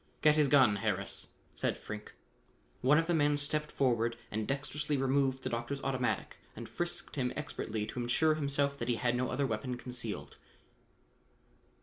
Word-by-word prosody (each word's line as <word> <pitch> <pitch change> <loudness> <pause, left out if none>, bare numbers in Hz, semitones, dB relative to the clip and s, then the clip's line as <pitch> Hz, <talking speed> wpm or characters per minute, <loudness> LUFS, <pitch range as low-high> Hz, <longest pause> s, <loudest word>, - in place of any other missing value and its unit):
"Get 150 - +7
his 150 -1 +4
gun, 130 -7 +5
Harris," 105 +1 -2 0.3
said - - -1
Frink. 105 0 -8 0.7
One 135 +4 +5
of 165 - +3
the 175 - +1
men 145 -2 +3
stepped 150 +1 0
forward 115 -3 +1
and 110 0 -2
dextrously 145 +1 -1
removed 135 0 +1
the - - -1
doctor's 120 +4 -2
automatic 130 -2 -1 0.2
and - - -7
frisked - - -3
him - - +1
expertly 105 -1 -3
to 110 - -6
insure 140 +7 +3
himself 140 -1 0
that 120 - -2
he 120 - +3
had 120 +1 +1
no 125 0 0
other 140 - 0
weapon 125 +1 -2
concealed. 120 -4 -5
130 Hz, 160 wpm, -32 LUFS, 120-145 Hz, 0.7 s, Get